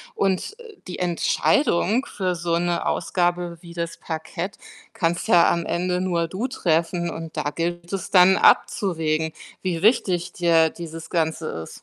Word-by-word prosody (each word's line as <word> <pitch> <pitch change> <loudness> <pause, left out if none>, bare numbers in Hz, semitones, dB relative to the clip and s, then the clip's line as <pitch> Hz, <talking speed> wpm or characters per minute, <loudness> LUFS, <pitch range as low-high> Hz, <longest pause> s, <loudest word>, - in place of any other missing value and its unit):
Und, 195 - -1
äh, 455 -3 -12
die 180 - -6
Entscheidung 210 - +1
für 185 -2 -2
so 170 0 -1
'ne 175 0 -1
Ausgabe 175 -1 -1
wie 170 -1 -12
das 170 -1 -4
Parkett 165 +4 -5 0.4
kannst 170 -1 -1
ja 170 -1 +6
am 170 -1 -1
Ende 180 +1 -1
nur 170 -3 0
du 190 +9 -3
treffen. 170 -6 0
Und 165 -1 -7
da 150 -1 -1
gilt 175 +2 -4
es 195 -1 -3
dann 190 0 +6
abzuwägen, 160 -8 +2 0.3
wie 175 -3 -2
wichtig 185 -5 +2
dir 165 -2 +3
dieses 165 0 -9
Ganze 160 -2 -1
ist. 80 0 -8
175 Hz, 150 wpm, -23 LUFS, 165-185 Hz, 0.4 s, ja